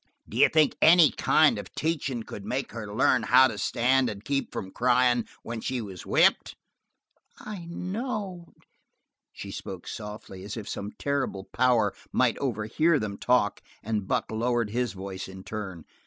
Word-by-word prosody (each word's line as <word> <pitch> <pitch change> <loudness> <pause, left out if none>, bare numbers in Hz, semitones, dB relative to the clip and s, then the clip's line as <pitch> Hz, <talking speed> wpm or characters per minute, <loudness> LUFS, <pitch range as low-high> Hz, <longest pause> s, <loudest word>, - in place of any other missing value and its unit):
D'you - - +4
think 155 -2 +4
that - - +1
any 165 -2 +7
kind 155 -1 +3
of - - -10
teachin' 140 -7 -2
could 100 - -9
make 130 +6 -3
her 105 -3 -6
learn 115 +3 +3
how 130 +4 +6
to 105 -5 -6
stand 125 +4 +2
and 105 0 -8
keep 140 +1 -1
from 95 - -5
cryin' 125 0 +2 0.2
when 115 -1 -5
she 130 +1 -2
was 95 -6 -8
whipped?" - - +3 0.8
"I 200 -5 -8
know." 185 0 -4 0.8
She - - -8
spoke 95 -2 -7
softly, 105 -3 -8
as 100 +3 -6
if 105 -2 -6
some 100 +1 -5
terrible 140 -9 -2
power 120 -5 +3 0.2
might 125 -3 +2
overhear 135 +6 +1
them 105 -5 -4
talk, 120 -5 +2 0.2
and 105 -2 -2
Buck - - -1
lowered 115 -1 0
his 120 -3 -1
voice 95 0 -6
in 95 0 -10
turn. 95 -7 -6
120 Hz, 160 wpm, -27 LUFS, 105-135 Hz, 0.8 s, any